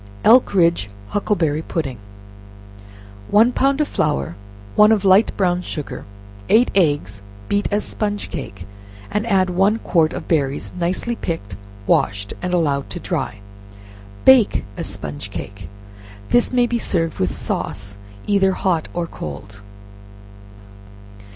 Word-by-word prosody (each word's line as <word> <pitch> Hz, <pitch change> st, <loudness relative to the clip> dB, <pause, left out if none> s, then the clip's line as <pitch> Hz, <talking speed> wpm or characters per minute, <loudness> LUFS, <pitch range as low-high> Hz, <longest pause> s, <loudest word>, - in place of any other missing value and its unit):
Elkridge 175 Hz, -, +4 dB, 0.2 s
Huckleberry 165 Hz, -7 st, 0 dB
Pudding. 135 Hz, -8 st, -4 dB, 1.3 s
One 225 Hz, +4 st, +5 dB
pound 275 Hz, +3 st, +1 dB
of 300 Hz, -, +1 dB
flour, 70 Hz, +5 st, -1 dB, 0.4 s
one 210 Hz, +1 st, +6 dB
of 205 Hz, -3 st, +2 dB
light 195 Hz, +3 st, +5 dB
brown 180 Hz, -2 st, +1 dB
sugar, 150 Hz, -5 st, -6 dB, 0.4 s
eight 235 Hz, +3 st, +4 dB
eggs 145 Hz, -, +1 dB, 0.3 s
beat 205 Hz, 0 st, 0 dB
as 205 Hz, +1 st, 0 dB
sponge 205 Hz, -1 st, -3 dB
cake, 95 Hz, -3 st, -7 dB, 0.5 s
and 210 Hz, +2 st, -1 dB
add 190 Hz, -4 st, +2 dB
one 195 Hz, +5 st, +3 dB
quart 165 Hz, -7 st, +1 dB
of -, -, -6 dB
berries, 145 Hz, -4 st, 0 dB
nicely 185 Hz, +7 st, -1 dB
picked, 135 Hz, -, -5 dB, 0.3 s
washed, 100 Hz, +1 st, +1 dB
and 180 Hz, -, -2 dB
allowed 145 Hz, -6 st, 0 dB
to -, -, -5 dB
dry, 100 Hz, -, -3 dB, 0.8 s
bake 260 Hz, -, +5 dB
as -, -, -4 dB
sponge -, -, -6 dB
cake. 100 Hz, -1 st, -7 dB, 0.6 s
This 240 Hz, -, +3 dB
maybe 240 Hz, -1 st, +2 dB
served 165 Hz, -7 st, -1 dB
with 90 Hz, -3 st, 0 dB
sauce; 100 Hz, +4 st, -4 dB, 0.3 s
either 195 Hz, -2 st, +3 dB
Lot 175 Hz, -4 st, +1 dB
or 175 Hz, -1 st, -1 dB
cold. 100 Hz, -, -8 dB
175 Hz, 125 wpm, -20 LUFS, 135-205 Hz, 1.3 s, one